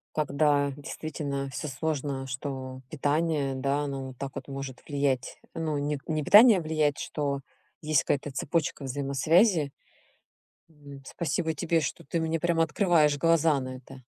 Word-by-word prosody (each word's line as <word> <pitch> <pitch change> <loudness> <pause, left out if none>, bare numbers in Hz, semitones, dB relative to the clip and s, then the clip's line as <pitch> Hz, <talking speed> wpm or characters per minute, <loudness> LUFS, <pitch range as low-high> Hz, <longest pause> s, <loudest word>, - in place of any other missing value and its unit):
Когда 145 -1 +2
действительно 145 -2 -4
всё 150 - -5
сложно, 140 -1 -2
что 130 0 -5
питание, 150 -1 0
да, 140 +2 0
оно 135 -2 -4
вот 130 -2 -11
так 140 -1 -5
вот 135 - -6
может 135 -2 -6
влиять. 140 -4 -1 0.2
Ну, 155 -3 -2
не 145 +1 -1
не 155 -2 -1
питание 210 - +8
влияет, 155 -2 +1
что 140 -2 -2 0.4
есть 155 -3 +2
какая-то 145 0 -1
цепочка 145 0 -1
взаимосвязи. 145 - +2 1.0
М, 145 -2 -12
спасибо 160 +1 -2
тебе, 165 +2 +1
что 135 - -4
ты 165 +5 -2
мне 160 0 -1
прям 170 0 +1
открываешь 160 -3 +3
глаза 165 -2 +3
на 130 0 -5
это. 130 +1 -13
145 Hz, 145 wpm, -28 LUFS, 135-160 Hz, 1.0 s, питание